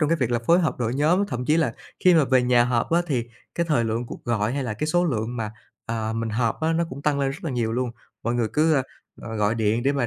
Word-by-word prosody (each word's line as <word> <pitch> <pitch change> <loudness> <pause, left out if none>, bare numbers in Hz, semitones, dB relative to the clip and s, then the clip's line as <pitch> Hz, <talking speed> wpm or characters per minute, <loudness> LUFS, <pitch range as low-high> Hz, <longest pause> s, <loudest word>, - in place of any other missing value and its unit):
trong 150 - +2
cái 165 - +3
việc 125 -4 -1
là 120 - +2
phối 170 +2 +6
hợp 160 - -1
đội 115 0 -1
nhóm, 170 +8 +2
thậm 125 -9 -4
chí 155 +5 +3
là 165 - +1 0.3
khi 180 -1 +7
mà 155 -3 +5
về 130 -1 +3
nhà 120 -1 +4
họp 120 +2 0
á 170 - +4
thì 125 -6 0 0.3
cái 170 -1 0
thời 120 -7 +2
lượng 115 +2 -2
cuộc - - -9
gọi 115 -1 0
hay 140 -1 -1
là 110 -3 -3
cái 150 +8 -2
số 175 +3 +2
lượng 120 -5 -1
mà, 110 -2 -3 0.4
à, 110 -1 -2
mình 115 0 -2
họp 115 +3 0
á 160 +1 +1
nó 170 +1 +1
cũng 140 +2 -8
tăng 145 -2 +1
lên 135 -1 +1
rất 165 +8 -8
là 160 - -2
nhiều 115 -3 -1
luôn, 125 0 -1 0.3
mọi 120 +1 -1
người 115 -2 +1
cứ, 155 +1 +3
ơ, 135 - +3 0.4
ờ, 115 -1 -5
gọi 105 +1 +1
điện 110 +1 +1
để 140 +2 +2
mà 135 -4 0
125 Hz, 300 wpm, -24 LUFS, 115-155 Hz, 0.4 s, khi